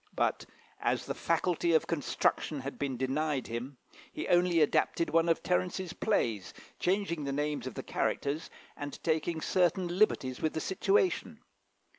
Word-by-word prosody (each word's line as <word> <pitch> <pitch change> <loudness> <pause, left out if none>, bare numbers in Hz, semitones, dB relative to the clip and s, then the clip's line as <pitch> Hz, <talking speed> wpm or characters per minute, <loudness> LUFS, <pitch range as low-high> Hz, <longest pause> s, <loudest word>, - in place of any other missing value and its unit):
But, - - 0 0.3
as - - 0
the - - -2
faculty 170 -1 +1
of 160 - +3
construction 150 -1 0
had 135 +2 -6
been 135 -3 -2
denied 135 +1 0
him, 125 +4 -5 0.3
he - - -4
only 175 -1 +4
adapted 160 +2 +2
one 165 +1 +3
of 165 - +2
Terence's 180 0 0
plays, 115 - 0 0.2
changing 180 -5 0
the 140 - -1
names 145 -2 -1
of 130 - -6
the - - -5
characters, 145 +3 -1 0.3
and 145 0 -6
taking 160 0 0
certain 180 +1 +1
liberties 130 -11 +2
with 155 - 0
the - - -1
situations. 385 - +1
160 Hz, 150 wpm, -31 LUFS, 140-175 Hz, 0.3 s, only